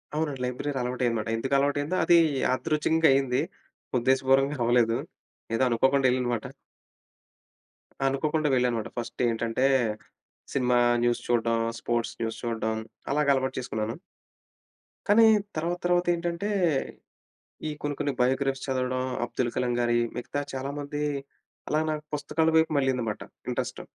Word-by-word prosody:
అవునండి. 150 -4 -1
లైబ్రరీ 125 +4 -3
అలవాటు 125 +1 -3
అయ్యింది 120 -1 +2
అన్నమాట. 110 - -4
ఎందుకు 135 +4 -3
అలవాటు 145 +1 +1
అయిందో, 165 +6 -2
అది 170 0 +6 0.3
యాదృచంగా 155 +5 +2
అయింది. 135 -2 +1 0.6
ఉద్దేశపూర్వంగా 135 +3 +2
అవ్వలేదు. 120 -1 +3 0.6
ఏదో 130 - +2
అనుకోకుండా 135 +3 +2
వెళ్ళాననమాట. 125 -2 -1 1.6
అనుకోకుండా 150 +3 +1
వెళ్ళానమాట. 120 -3 +1
ఫస్ట్ 120 +1 -4
ఏంటంటే, 115 +3 0 0.9
సినిమా 125 -2 +2 0.3
న్యూస్ 120 0 +1
చూడ్డం, 115 -1 +2 0.2
స్పోర్ట్స్ 120 0 -2
న్యూస్ 115 -1 -3
చూడ్డం 110 -1 -1 0.4
అలాగా 145 -1 +3
అలవాటు 130 0 -2
చేసుకున్నాను. 110 0 -3 1.1
కానీ 225 +2 +7 0.3
తర్వాత 170 +2 -1
తర్వాత 175 0 +2
ఏంటంటే, 170 +3 -3 1.2
ఈ - - -2
కొన్ని 145 -1 -2
కొన్ని 145 -1 0
బయో‌గ్రఫీస్ 135 +2 +1
చదవడం. 130 -1 -1 0.2
అబ్దుల్ 120 0 -2
కలాం 125 -1 0
గారి 120 0 +2 0.2
మిగతా 145 +4 -3
చాలా 135 +2 -3
మంది, 145 +1 -4 0.7
అలా 155 +1 +2
నాకు 150 0 -4
పుస్తకాల 160 +2 0
వైపు 160 0 +3
మళ్లింది 130 -3 0
మాట 105 - -5 0.3
ఇంట్రెస్ట్. - - -3
130 Hz, 130 wpm, -27 LUFS, 120-145 Hz, 1.6 s, కానీ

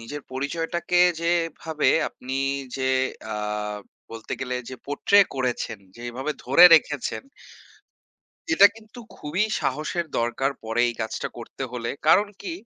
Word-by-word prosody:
নিজের 145 +5 -7
পরিচয়টাকে 165 +6 -1 0.2
যেভাবে 165 -3 0 0.2
আপনি 130 +1 -7 0.4
যে 130 - -4 0.5
আ - - -3 0.8
বলতে 115 -1 -8
গেলে 125 -1 -3
যে 130 - -6
পোর্ট্রে 200 +8 +4
করেছেন 125 -5 -2 0.2
যেভাবে 120 +4 -5
ধরে 135 +7 +7
রেখেছেন 145 - +1 1.3
এটা 320 - +8
কিন্তু 220 +2 -15 0.2
খুবই 160 +8 -2 0.2
সাহসের 155 +5 -2
দরকার 120 +4 0
পড়ে 115 +2 -1
এই 120 - -3
কাজটা 110 0 -3
করতে 120 +3 -8
হলে। 120 -2 -3 0.2
কারণ 200 +6 +5
কি? 345 - -5
140 Hz, 125 wpm, -24 LUFS, 125-170 Hz, 1.3 s, এটা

